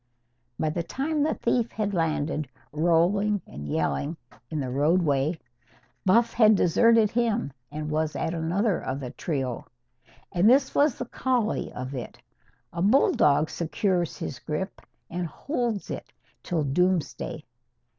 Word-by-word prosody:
By 155 - 0
the 170 - -1
time 285 - -2
the 310 +2 +1
thief 235 -2 0
had 210 -2 -2
landed, 155 -4 -1 0.2
rolling 175 +6 +2
and 75 +1 -8
yelling, 140 - -1 0.3
in 155 - -3
the 130 -3 -3
roadway, 150 +1 +2 0.7
Buff 230 +5 +4
had 220 -2 +6
deserted 225 +4 +4
him, 235 - 0 0.2
and 150 0 -4
was 155 0 0
at 165 - -1
another 175 +4 0
of 130 +1 -3
the 125 -3 -6
trio. 135 -7 -3 0.6
And 180 +5 +4
this 265 +2 +4
was 285 -3 +3
the 250 - -4
collie 250 -2 -1
of 130 +2 -5
it. 125 -3 -6 0.6
A 170 - -3
bulldog 160 - +4
secures 175 0 -1
his 130 - -5
grip 190 +6 -4 0.3
and 175 0 -3
holds 240 - -3
it - - -6 0.3
till 165 -4 -1
doomsday. 160 -1 0
175 Hz, 135 wpm, -26 LUFS, 150-215 Hz, 0.7 s, had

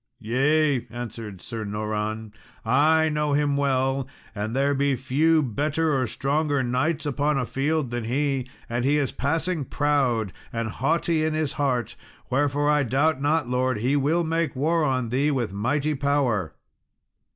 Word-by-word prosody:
"Yea," 135 +3 +1
answered 115 -5 -7
Sir 110 +6 -5
Noran, 105 +1 -3 0.3
"I 155 +6 +4
know 150 -1 0
him 145 0 +2
well, 135 -1 0 0.3
and 110 +3 -3
there 140 +1 +2
be 140 0 +1
few 150 +5 +2
better 150 +5 0
or 130 -2 +1
stronger 140 +3 0
knights 145 +6 0
upon 145 +1 0
a 125 - 0
field 140 0 -1
than 120 -2 -3
he; 135 +1 -1 0.2
and 120 +1 -2
he 145 +3 +3
is 140 -4 0
passing 160 +3 -1
proud 130 - 0 0.2
and 115 -1 -2
haughty 160 +6 0
in 155 0 0
his 155 -2 -1
heart; 125 -5 -1 0.4
wherefore 145 +2 +1
I 150 0 +4
doubt 140 +3 +1
not, 145 -1 +1
Lord, 125 -1 0
he 125 +7 +1
will 150 +5 +2
make 165 -3 -1
war 160 +5 +1
on 130 -5 0
thee 135 +5 +1
with 125 -9 -1
mighty 140 +9 0
power." 130 - 0
140 Hz, 155 wpm, -25 LUFS, 120-150 Hz, 0.4 s, I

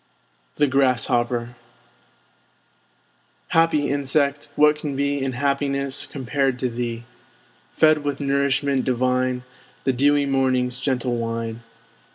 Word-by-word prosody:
THE 145 - +3
GRASSHOPPER 120 -3 +1 1.9
Happy 165 -3 +3
Insect! 140 +1 0
what 150 0 +4
can 145 -3 -4
be 140 0 0
In 135 -1 -2
happiness 140 +1 -1
compared 135 -1 -1
to 125 0 -1
thee? 120 0 -4 0.7
Fed 155 -1 +4
with 145 -1 -2
nourishment 140 -1 +1
divine, 125 0 0 0.4
The 130 - +1
dewy 145 +3 +3
Morning's 130 -2 0
gentle 130 -3 -1
wine! 115 0 -4
135 Hz, 105 wpm, -22 LUFS, 125-140 Hz, 1.9 s, what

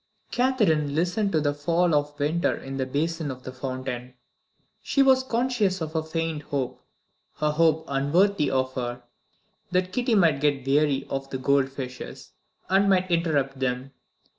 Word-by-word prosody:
Catherine 200 - +2
listened 180 +5 +1
to 160 - +2
the 145 -1 +1
fall 165 +4 +1
of 145 0 0
water 155 +4 +1
in 135 0 -7
the 130 -1 -1
basin 160 +3 -1
of 130 -1 -7
the 130 - -6
fountain. 130 -1 -5 0.7
She 275 - +2
was 265 -1 +5
conscious 235 -6 0
of 160 -1 -5
a 160 - +2
faint 160 -1 -3
hope 140 -4 -3 0.6
a 150 0 +2
hope 160 0 +2
unworthy 150 +6 +2
of 130 -1 0
her 125 -1 -4 0.7
that 185 0 0
Kitty 245 0 +1
might 165 -8 +3
get 145 -3 +1
weary 140 0 +2
of 135 0 -4
the 130 - -3
gold 135 0 +2
fishes, 130 -2 -8 0.4
and 195 +1 +3
might 185 -1 +2
interrupt 145 -6 +1
them. 130 +1 -2
150 Hz, 160 wpm, -25 LUFS, 135-180 Hz, 0.7 s, was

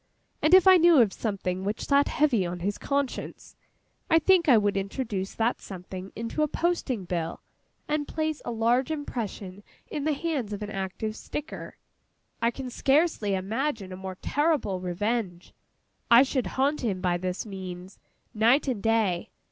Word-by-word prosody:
—and 315 +4 +6
if 375 0 +6
I 375 -1 +9
knew 340 -3 +6
of 220 -5 +4
something 190 -4 -3
which 205 +2 -3
sat 280 0 +3
heavy 270 -10 +2
on 175 0 -4
his 200 +3 -2
conscience, 280 -2 -3 0.5
I 325 - +6
think 340 0 +4
I 245 - +8
would 205 -1 +1
introduce 200 0 -3
that 230 +2 0
something 185 0 -8
into 230 +7 -3
a 305 - +3
Posting 295 - -1
Bill, 170 -2 -3 0.5
and 300 -1 -1
place 310 -1 -2
a - - -5
large 240 +4 +1
impression 220 -10 -5 0.3
in 295 - -3
the 310 - +2
hands 280 -8 -2
of 205 +1 -5
an 210 - -6
active 195 +2 -4
sticker. 300 +6 -7 0.6
I 235 - +3
can 255 +1 -6
scarcely 270 - +2
imagine 215 +1 -2
a - - -5
more 190 0 -7
terrible 290 - +1
revenge. 185 0 -3 0.6
I 235 +2 +8
should 265 -2 -1
haunt 280 +3 +1
him, 205 -7 -1
by 180 -1 +1
this 185 +3 -3
means, 190 -2 -8 0.3
night 235 +7 +3
and 245 -6 -1
day. 220 -6 +1
225 Hz, 165 wpm, -27 LUFS, 190-285 Hz, 0.6 s, I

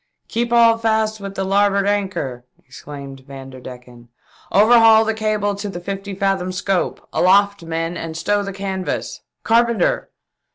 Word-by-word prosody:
" - - -54
Keep 235 +1 -2
all 230 -1 +5
fast 220 -1 0
with 195 -1 -7
the 195 - -2
larboard 200 +1 +2
anchor 190 -12 -2
!" - - -35
exclaimed 140 0 -10
Vanderdecken. 125 -3 -11 0.2
" - - -28
Overhaul 225 +1 +6
the 220 - 0
cable 215 -2 -1
to 200 +1 -5
the 175 - -6
fifty 195 +2 -6
fathom 195 -2 -1
scope. 185 0 -2
Aloft 200 +2 +3
men 165 +1 -3
and 165 -1 -6
stow 205 +4 0
the 200 -1 -5
canvas. 190 -1 -4 0.2
Carpenter 235 - +1
195 Hz, 155 wpm, -19 LUFS, 165-215 Hz, 0.2 s, Overhaul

